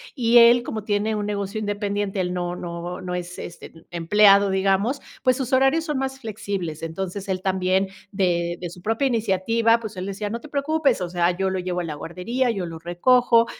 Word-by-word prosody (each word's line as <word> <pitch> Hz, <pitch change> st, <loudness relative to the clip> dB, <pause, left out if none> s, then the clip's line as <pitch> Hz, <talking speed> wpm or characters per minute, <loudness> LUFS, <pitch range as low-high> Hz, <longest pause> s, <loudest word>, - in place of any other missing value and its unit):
y 240 Hz, -3 st, +5 dB
él 235 Hz, +1 st, +7 dB
como 220 Hz, -3 st, -5 dB
tiene 210 Hz, +1 st, 0 dB
un 210 Hz, -1 st, -2 dB
negocio 200 Hz, +1 st, -3 dB
independiente, 205 Hz, -1 st, -2 dB
él 180 Hz, -1 st, -1 dB
no 175 Hz, -1 st, -2 dB
no 175 Hz, 0 st, -6 dB
no 180 Hz, 0 st, -4 dB
es, 180 Hz, 0 st, -6 dB
este, 175 Hz, -, -8 dB
em 165 Hz, 0 st, -19 dB, 0.2 s
empleado, 200 Hz, 0 st, +6 dB
digamos, 195 Hz, +7 st, +1 dB, 0.2 s
pues 255 Hz, 0 st, +3 dB
sus 265 Hz, -1 st, -3 dB
horarios 270 Hz, +5 st, +3 dB
son 300 Hz, -4 st, -2 dB
más 265 Hz, 0 st, -3 dB
flexibles, 200 Hz, -, -4 dB
entonces 190 Hz, +4 st, -5 dB
él 185 Hz, -1 st, -1 dB
también, 190 Hz, 0 st, +1 dB, 0.2 s
de 175 Hz, -3 st, 0 dB
de 175 Hz, -, -5 dB
su 175 Hz, +1 st, -12 dB
propia 225 Hz, +7 st, 0 dB
iniciativa, 230 Hz, 0 st, +2 dB
pues 220 Hz, -3 st, -7 dB
él 185 Hz, +1 st, -4 dB
decía: 200 Hz, +1 st, -4 dB
"No 230 Hz, +2 st, -4 dB
te 305 Hz, -, -12 dB
preocupes, 290 Hz, -1 st, +1 dB
o 180 Hz, -, -2 dB
sea, 175 Hz, 0 st, +2 dB
yo 190 Hz, 0 st, 0 dB
lo 190 Hz, 0 st, -2 dB
llevo 180 Hz, 0 st, -2 dB
a -, -, -2 dB
la 155 Hz, -, -4 dB
guardería, 185 Hz, -, -2 dB
yo 195 Hz, -6 st, -2 dB
lo 165 Hz, -1 st, -7 dB
recojo, 230 Hz, +7 st, +3 dB
200 Hz, 205 wpm, -23 LUFS, 180-230 Hz, 0.2 s, él